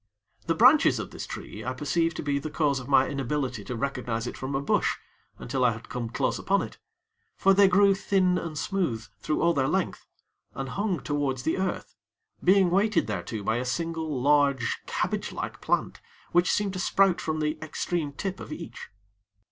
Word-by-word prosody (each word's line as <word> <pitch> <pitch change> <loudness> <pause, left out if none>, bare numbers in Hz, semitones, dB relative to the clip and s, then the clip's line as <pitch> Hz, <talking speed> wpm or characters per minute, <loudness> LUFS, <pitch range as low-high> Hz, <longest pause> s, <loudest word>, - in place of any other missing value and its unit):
The - - +2
branches - - +6
of - - -5
this - - -7
tree, 110 - -7
I 130 +3 -2
perceived 165 +5 0
to - - -4
be 140 -1 0
the 155 - -5
cause 145 -3 +1
of 130 - -9
my 135 -1 +4
inability 135 -4 -2
to 125 - -4
recognize 125 -3 -2
it - - -5
from 135 +1 -4
a - - +1
bush, 140 - +1 0.4
until 135 -2 -2
I 120 -2 +4
had 115 +1 -11
come 120 -2 -4
close 115 - -1
upon - - +1
it; - - -9 0.6
for 195 - +5
they 200 0 +6
grew 200 +2 +5
thin 190 -1 +2
and 160 -3 -6
smooth 145 - -1
through 155 - -1
all 170 0 +4
their 135 -3 +1
length, 185 +4 -1 0.5
and 135 -1 -4
hung 195 -2 -1
towards 135 -1 -1
the 160 +6 0
earth; 190 -1 -3 0.5
being 190 -1 +5
weighted 205 +3 +2
thereto 105 +1 -4
by 110 +3 +1
a 125 - -1
single, 160 +2 -2
large 140 -3 +2
cabbage - - -2
like - - -5
plant - - -1 0.3
which 175 +1 +3
seemed 205 -2 0
to 185 - -4
sprout 190 -1 +3
from 155 0 -2
the 155 0 -1
extreme 155 0 -2
tip 190 +6 -4
of - - -9
each. - - -8
145 Hz, 190 wpm, -27 LUFS, 130-180 Hz, 0.6 s, branches